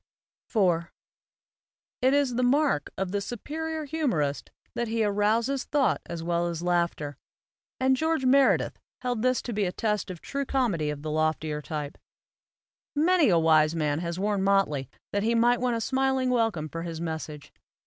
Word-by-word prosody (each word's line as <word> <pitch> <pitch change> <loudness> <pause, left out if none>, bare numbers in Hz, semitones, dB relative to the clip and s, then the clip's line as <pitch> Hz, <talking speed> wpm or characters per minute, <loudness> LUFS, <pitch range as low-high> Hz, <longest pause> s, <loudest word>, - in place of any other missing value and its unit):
IV 175 -6 +2 1.1
IT 260 +2 +4
is 280 -3 +2
the 245 - 0
mark 265 - +2
of 190 -1 -2
the 200 0 -1
superior 310 +9 -4
humorist 240 - -1 0.2
that 235 0 -2
he 225 0 0
arouses 220 +6 +1
thought 285 -3 +1
as 170 -1 -5
well 170 0 0
as 170 0 -4
laughter; 170 -5 0 0.6
and 260 0 +3
George 315 -1 0
Meredith 270 +1 +3 0.2
held 245 -3 -1
this 255 0 +1
to 240 - -4
be 210 0 0
the 180 - -1
test 210 -1 -1
of 180 -2 -6
true 280 +9 -3
comedy 230 - 0
of 150 -1 -5
the 155 - -3
loftier 155 -1 0
type. 150 -2 -5 1.0
Many 320 -1 +4
a 175 - +4
wise 160 -1 +4
man 150 -2 0
has 170 0 -3
worn 205 0 0
motley 190 -9 +1 0.2
that 200 - 0
he 230 +3 +1
might 240 +1 +3
win 250 -2 +1
a - - -1
smiling 265 +1 +1
welcome 225 -10 +1
for 165 +3 -6
his 165 -1 -5
message. 160 -3 -6
205 Hz, 170 wpm, -27 LUFS, 165-255 Hz, 1.1 s, IT